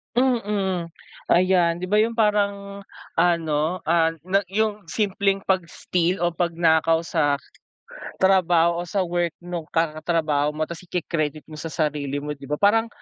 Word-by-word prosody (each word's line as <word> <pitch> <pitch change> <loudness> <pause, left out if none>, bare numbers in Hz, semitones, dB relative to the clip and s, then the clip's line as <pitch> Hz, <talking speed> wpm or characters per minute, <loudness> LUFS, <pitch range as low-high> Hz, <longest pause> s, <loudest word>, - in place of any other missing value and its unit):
Mm, 205 -9 0 0.3
ayan 175 -1 +3
'di 185 - -4
ba 210 - +3
'yung 225 +2 +2
parang 200 -2 0 0.3
ano, 165 0 +1
ah, 165 0 +2
na 190 +4 0
'yung 210 +1 -1
simpleng 195 +1 0
pag-steal 180 -1 -1
o 175 - +3
'pagnakaw 165 -1 +2
sa 160 -3 +1 0.8
trabaho 175 -3 +3
o 175 - -5
sa 190 +2 0
work 175 -1 -1
nung 175 -3 -5
katrabaho 155 -2 0
mo 155 - -1
tapos 170 +3 -8
iki-credit 155 -4 -2
mo 155 - -8
sa 165 - -5
sarili 145 -3 -2
mo 150 - -4
'di 140 -2 -8
ba 150 - -1
parang 220 +6 +3
175 Hz, 145 wpm, -23 LUFS, 160-195 Hz, 0.8 s, ayan